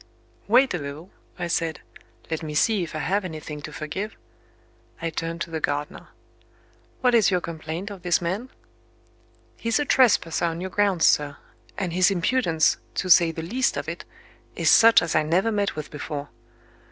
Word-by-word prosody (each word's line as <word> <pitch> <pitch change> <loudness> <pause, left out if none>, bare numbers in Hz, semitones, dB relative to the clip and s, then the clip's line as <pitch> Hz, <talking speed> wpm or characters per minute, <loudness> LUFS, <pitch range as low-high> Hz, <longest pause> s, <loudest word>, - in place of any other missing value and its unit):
"Wait 250 +4 +4
a 180 - -2
little," 145 +5 -8 0.3
I 180 - -3
said. 165 -2 -1 0.5
"Let 160 - -2
me 155 -2 -6
see 215 +5 +2
if 165 -2 -5
I 155 - -3
have 200 +3 +1
anything 155 -3 -7
to 155 - -8
forgive." 170 +9 -5 0.8
I 165 -1 -3
turned 165 +1 -4
to 165 - -4
the 160 - -2
gardener. 145 +4 -3 0.9
"What 250 -1 +3
is 225 -4 +5
your 180 -2 +1
complaint 165 +4 -6
of 195 -3 -9
this 175 -1 +2
man?" 190 +9 -3 1.1
"He's 230 0 0
a 295 - 0
trespasser 205 - +3
on 165 0 -2
your 185 +1 -5
grounds, 200 -5 +2
sir. 145 -1 +2 0.4
And, 180 -4 -2
his 185 +2 +4
impudence, 175 -3 +2 0.2
to 185 - -1
say 170 0 +7
the 160 0 -6
least 245 +10 0
of - - -4
it, - - -5 0.5
is - - +3
such 230 -3 +7
as 170 - -2
I 155 - +5
never 175 +8 +1
met 205 -2 -1
with 155 -1 -6
before." 145 -1 -6
170 Hz, 175 wpm, -24 LUFS, 160-200 Hz, 1.1 s, say